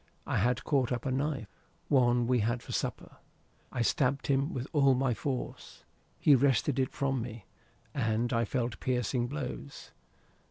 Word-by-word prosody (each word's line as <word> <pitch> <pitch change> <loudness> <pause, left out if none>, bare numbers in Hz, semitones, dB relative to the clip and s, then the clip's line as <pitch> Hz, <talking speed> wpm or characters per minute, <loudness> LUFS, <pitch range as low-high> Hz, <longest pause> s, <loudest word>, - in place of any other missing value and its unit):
I - - 0
had 125 +5 +1
caught 135 -4 +1
up 120 0 -2
a 135 - 0
knife, 135 -2 -1 0.4
one 120 -3 +3
we 125 0 +2
had 120 +3 0
for - - -8
supper. - - -3 0.5
I 120 - 0
stabbed 135 +3 +1
him 140 +2 +1
with 130 -1 -3
all 140 -3 +5
my 130 -1 +1
force. 130 +2 -5 0.4
He 145 - +6
wrested 135 0 +3
it 130 - +1
from 135 -3 -1
me, 115 -4 -7 0.5
and 115 -1 0
I 115 0 +2
felt 120 0 -2
piercing 125 -1 0
blows. 140 0 -6
125 Hz, 160 wpm, -31 LUFS, 120-135 Hz, 0.5 s, He